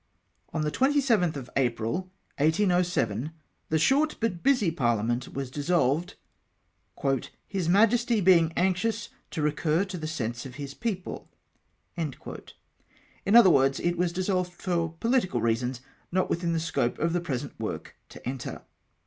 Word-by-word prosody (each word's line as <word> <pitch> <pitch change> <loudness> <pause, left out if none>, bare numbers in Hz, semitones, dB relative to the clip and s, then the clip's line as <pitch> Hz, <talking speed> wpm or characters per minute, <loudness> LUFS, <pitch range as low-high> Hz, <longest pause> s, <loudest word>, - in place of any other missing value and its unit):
On 155 - -1
the 150 - 0
27tli 255 - +2
of 135 -3 -6
April, 125 +7 0 0.3
1807, 160 - +2 0.4
the 160 - +2
short 285 - +3
but 200 -7 -1
busy 250 -10 +3
par 120 -8 +1
Hament 120 +4 -2
was 135 -2 -4
dissolved, 150 +1 +1 0.7
" - - -23 0.4
his 190 -5 -2
Miijesty 230 +4 +4
being 170 -3 +5
anxious 190 +4 0 0.2
to 155 - -3
recur 155 +4 +1
to 190 -2 -6
the 155 - -4
sense 120 -6 -3
of 130 -2 -9
his 140 -1 -6
people." 200 -1 -4 0.7
In 170 - -6
other 225 -6 +9
words, 135 -2 +3
it 175 0 0
was 175 0 +1
dissolved 180 0 -1
for 170 -2 -1
pohtical 230 - +1
reasons 120 +2 0 0.3
not 185 +1 +1
within 170 0 0
the 165 - +1
scope 160 -7 -1
of 165 +1 0
the 175 - +1
present 135 -8 -4
work - - -5
to - - -10
enter. 130 -1 -5
170 Hz, 145 wpm, -27 LUFS, 135-190 Hz, 0.7 s, other